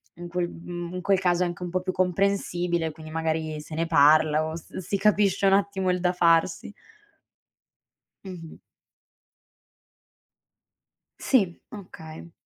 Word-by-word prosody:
in 175 +1 -8
quel 175 0 -1
mhmm, 175 0 -7
in 180 - -4
quel 195 0 +2
caso 180 -1 +1
è - - +1
anche 175 +1 -6
un 175 - -4
po' 185 +1 -1
più 185 0 -2
comprensibile, 180 -3 0
quindi 155 0 -12
magari 160 -1 -2
se 155 +1 -9
ne 165 +1 -1
parla 155 +1 +4
o 160 0 -5
s 165 - -10
si 190 +2 -2
capisce 200 -1 +2
un 195 - +4
attimo 195 -1 +1
il 180 - -1
da 180 0 +1
farsi. 170 +2 +2 1.5
Mh-mh. 175 -4 -9 2.6
Sì, 195 -10 +1
okay. 165 -5 -11
175 Hz, 140 wpm, -25 LUFS, 160-185 Hz, 2.6 s, parla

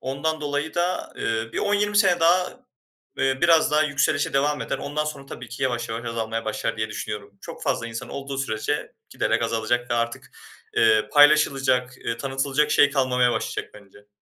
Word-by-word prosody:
Ondan 155 +4 -2
dolayı 145 +1 -2
da, 175 +1 -1
eee, 115 0 -2
bir - - -3
10-20 205 0 +1
sene 185 -4 +4
daha, 180 +9 +2 0.5
eee, 135 0 +1
biraz 165 -3 +5
daha 155 +1 +4
yükselişe 145 -1 0
devam 145 -1 +1
eder. - - -3
Ondan 150 +1 -3
sonra 145 -2 -6
tabii 120 -3 -9
ki 120 - -5
yavaş 120 -3 -1
yavaş 115 +2 -4
azalmaya 115 0 -3
başlar 110 +1 -2
diye 110 0 -2
düşünüyorum. 100 -1 -6
Çok - - -9
fazla 115 - -1
insan 115 0 -7
olduğu 140 0 -6
sürece 110 -5 -2 0.2
giderek - - 0
azalacak 120 +2 -1
ve - - +3
artık, 115 0 -2 0.5
eee, 110 -1 +4
paylaşılacak, 135 -4 +4
eee, 115 0 -4
tanıtılacak 135 +3 0
şey 145 - +5
kalmamaya 125 -3 +2
başlayacak - - -3
bence. 100 0 -17
135 Hz, 175 wpm, -24 LUFS, 115-150 Hz, 0.5 s, biraz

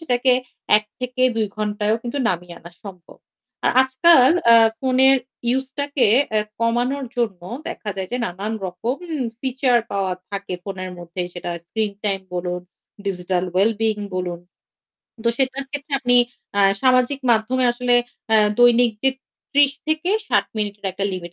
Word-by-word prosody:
সেটাকে 255 -4 +2 0.5
১ 215 - -11 0.2
থেকে 250 0 -2
২ 220 -2 +1
ঘণ্টায়ও 210 +1 0
কিন্তু 245 +4 -4
নামিয়ে 175 -1 -3
আনা 170 +1 -13
সম্ভব। 185 -4 -11 0.5
আ - - +5
আজকাল 260 +1 +5 0.2
আ - - +9 0.3
ফোনের 265 +1 +4 0.3
ইউসটাকে 265 +1 0 0.2
অ্যা 215 -1 +2 0.2
কমানোর 245 +4 0
জন্য 220 -7 -1 0.3
দেখা 210 - -5
যায় 190 -1 -4
যে 245 - 0
নানান 200 +4 -4
রকম 225 +8 -3 0.4
ফিচার 255 -1 +2
পাওয়া 195 -2 -1 0.2
থাকে 200 -2 -4
ফোনের 185 -1 -6
মধ্যে, 175 +1 -5
সেটা 175 0 -6 0.2
স্ক্রিন 215 +1 -2
টাইম 195 -2 0
বলুন, 180 0 -3 0.5
ডিজিটাল 180 -1 -1
ওয়েল 195 +5 +4
বিইং 220 -2 0 0.2
বলুন। 175 -1 -3 0.8
তো - - +3
সেটার 265 +1 -1
ক্ষেত্রে 290 0 -7
আপনি 245 -1 +3 0.4
আ - - +5 0.2
সামাজিক 255 +2 +3
মাধ্যমে 235 +3 +2
আসলে 245 0 +1 0.4
আ - - +7 0.2
দৈনিক 245 0 +5
জি 265 - +4 0.4
৩০ 285 -1 +5
থেকে 315 +3 0 0.2
৬০ - - +3
মিনিটের 205 -1 -3
একটা 195 +2 -3
লিমিট 175 -2 -6
230 Hz, 145 wpm, -21 LUFS, 195-260 Hz, 0.8 s, আ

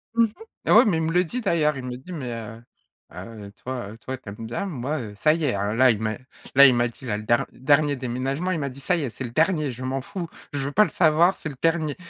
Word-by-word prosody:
Mmh 230 - +5
mh. - - -2 0.4
Et - - +1
ouais - - +8
mais 195 -7 +2
il 160 - 0
me 160 - 0
le 180 +1 +4
dit 240 +9 -4
d'ailleurs, 155 - +1
il 130 - -6
me 125 - -5
le 125 - -5
dit: 135 +8 -12
«Mais, 130 -7 -4
heu 115 0 -8 0.5
heu, 100 +3 -9
toi, 125 -5 -4
heu, 110 - -11
toi 130 +3 -6
tu 120 - -11
aimes 105 +3 -8
bien, 120 - -3
moi, 150 -3 -3
heu, 110 -5 -7
ça 155 +9 +4
y 165 -1 -1
est 125 - +1
hein», 100 +1 -1
là 130 +2 +5
il 110 - -2
m'a 110 -1 -2 0.4
là 140 +1 +10
il 130 - +7
m'a 120 0 +2
dit 120 - -14
là 105 -4 -1
le 105 - -7
der 120 +2 +2
dernier 145 +2 +2
déménagement 135 +7 -2
il 165 - -1
m'a 140 -2 -2
dit: 130 +1 -11
«Ça 175 +6 +1
y 165 - -2
est, 135 - -2
c'est 125 - -8
le 120 - -6
dernier 155 0 +1
je 125 +1 -8
m'en 135 +1 -2
fous. 175 +5 -6 0.3
Je 145 - -2
veux 135 +1 -2
pas 210 +8 +5
le 200 - -1
savoir 165 +3 +4
c'est 155 - -6
le 140 - -9
dernier». 160 -3 +1
135 Hz, 305 wpm, -24 LUFS, 120-160 Hz, 0.5 s, là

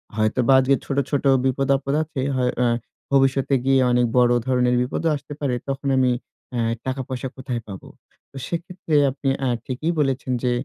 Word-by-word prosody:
হয়তো 110 +3 0
বা 135 - +6
আজকে 135 +1 +3
ছোট, 140 - -3
ছোট 145 - 0 0.2
বিপদ 135 +1 0
আপদ 140 +1 -3
আছে, 155 -3 -5 0.2
হয় 125 -1 +1
আ - - +3 0.5
ভবিষ্যতে 135 0 +3
গিয়ে 135 0 +4
অনেক 125 0 +3
বড় 120 -1 +5 0.2
ধরনের 125 -1 +2
বিপদও 150 +6 -1
আসতে 145 +1 -8
পারে। 135 -4 0
তখন 135 +1 -3
আমি 130 -1 +3 0.4
এ্যা 120 - 0 0.2
টাকা-পয়সা 130 0 -3
কোথায় 125 -3 -4
পাবো? 95 -2 -9 0.4
তো - - -23
সেক্ষেত্রে 170 -1 -3 0.2
আপনি 135 0 -2 0.2
আ - - +1 0.2
ঠিকই 135 +6 -2
বলেছেন 135 -2 0
যে 125 - +2
130 Hz, 175 wpm, -22 LUFS, 125-140 Hz, 0.5 s, বা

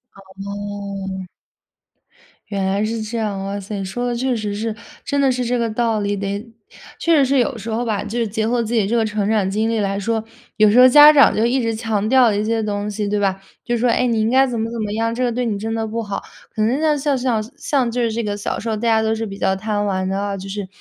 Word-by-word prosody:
哦。 195 -1 -6 1.2
原 195 -2 -2
来 195 +2 0
是 225 +1 -3
这 215 +2 -4
样， 210 -3 -2
哇 200 +1 -3
塞， 200 0 -5
说 245 +6 -3
的 240 - -1
确 255 +2 0
实 210 -2 -3
是， 220 +1 -2 0.3
真 285 - -1
的 275 -1 +4
是 250 0 -1
这 245 +1 0
个 230 -1 0
道 225 0 0
理。 205 0 -1
得 200 +3 -4 0.5
确 335 -1 +3
实 280 - +4
是 270 +1 +2
有 250 0 0
时 225 +1 -7
候 225 +2 -1
吧， 210 -3 -1
就 225 +3 -3
是 230 - 0
结 220 +1 -2
合 240 +1 +1
自 225 +1 -4
己 215 -4 +2
这 230 - 0
个 225 -1 +2
成 210 -1 -1
长 210 -3 +1
经 215 +3 0
历 230 -1 0
来 200 -1 -1
说， 225 +2 -1 0.3
有 215 0 +6
时 235 - +5
候 255 - +9
家 295 +3 +9
长 285 -2 +5
就 220 - +2
一 255 +2 +1
直 230 -1 -1
强 220 -2 -1
调 250 -2 +5
一 205 +1 0
些 225 0 0
东 205 0 -2
西， 210 0 -3
对 205 0 0
吧？ 195 -1 0 0.2
就 240 -1 0
说：” 240 +2 +2
哎， 250 - +2
你 230 -2 +1
应 215 - +1
该 265 +2 +5
怎 245 -2 -3
么 225 +1 -2
怎 235 -1 -4
么 210 -1 -3
样， 225 +1 0
这 250 - -3
个 245 - +2
对 245 +1 -1
你 215 -3 -1
真 225 +2 -3
的 225 0 -1
不 230 +2 -3
好。 200 -2 -4 0.3
“可 215 - -1
能 235 +6 +1
像 305 -2 +2
像 285 -1 0
像 245 -4 0
像 270 -4 0
就 245 +1 -1
是 230 -1 +1
这 235 - -1
个 205 -1 -2
小 205 - -3
时 230 - -4
候， 220 - 0
大 - - -7
家 225 -1 +3
都 220 0 +1
是 225 0 -3
比 195 -2 -7
较 190 - +1
贪 205 0 -2
玩 190 -2 -1
的 190 +1 -1
啊， 200 0 -2
就 195 +1 -8
是 200 -1 -4
220 Hz, 295 characters per minute, -20 LUFS, 205-235 Hz, 1.2 s, 候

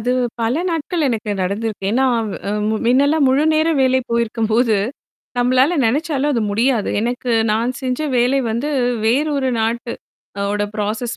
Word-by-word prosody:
அது 240 +3 -1 0.3
பல 230 +2 +1 0.2
நாட்கள் 325 0 -1
எனக்கு 220 -3 -2
நடந்திருக்கு. 205 +2 -3
ஏன்னா, 260 +3 +2
அவ் 220 -2 -2 0.2
அ - - -1 0.2
முன் 220 0 -1
எல்லாம் 280 +4 +3
முழுநேர 310 +4 +2
வேலை 260 0 +3
போயிருக்கும்போது 230 0 +1 0.6
நம்மளால 255 +5 +3
நினச்சாலும் 290 +3 0
அது 240 - 0
முடியாது. 230 +1 +1
எனக்கு 245 +2 -2 0.2
நான் 230 +3 0
செஞ்ச 255 +1 -2 0.2
வேலை 250 +3 +2
வந்து, 235 +6 -2 0.4
வேறு 275 +7 +2
ஒரு 265 -2 0
நாட் 230 +2 -1 0.6
அ - - -2
ஓட 205 0 -1
ப்ராசஸ் 215 +3 -3
245 Hz, 150 wpm, -19 LUFS, 225-275 Hz, 0.6 s, எல்லாம்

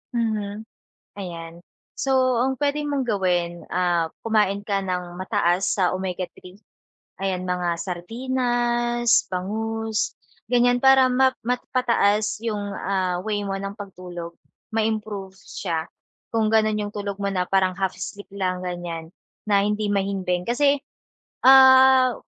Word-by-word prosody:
Mhm. 215 -2 -2 0.6
Ayan. 165 -3 -7 0.5
So 255 -2 +2
ang 265 +2 +1
puwede 290 +2 0
mong 280 -2 0
gawin, 180 -6 -1
ah, 175 -2 +1 0.2
kumain 210 -3 +1
ka 200 -1 0
ng 180 -2 -4
mataas 185 -2 +1
sa 185 -3 +2
omega-3. 185 0 -6 0.6
Ayan, 190 -2 -2
mga 180 -1 0
sardinas, 240 +4 0
bangus, 220 +4 -2 0.3
ganyan 245 0 +3
para 265 -1 +7
ma 260 +1 +4
mapataas 235 -4 +1
yung, 215 -3 -1 0.2
ah, 185 -2 -1
way 210 -1 -2
mo 195 -1 -3
ng 195 0 -5
pagtulog. 180 -4 -8 0.4
Ma-improve 215 -3 -2
siya, 170 -3 -4 0.4
kung 225 -1 +1
gano'n 215 -1 +3
yung - - -8
tulog 200 -1 -4
mo 200 - -1
na 180 -1 -1
parang 190 -1 +2
half 190 0 -1
sleep 200 +2 -7
lang 185 -2 -2
ganyan, 175 -2 -5 0.4
na 200 -1 +3
hindi 210 0 0
mahimbing. 190 -3 -1
Kasi, 280 +4 +3 0.7
ah, 260 -1 +8
200 Hz, 125 wpm, -23 LUFS, 185-240 Hz, 0.7 s, ah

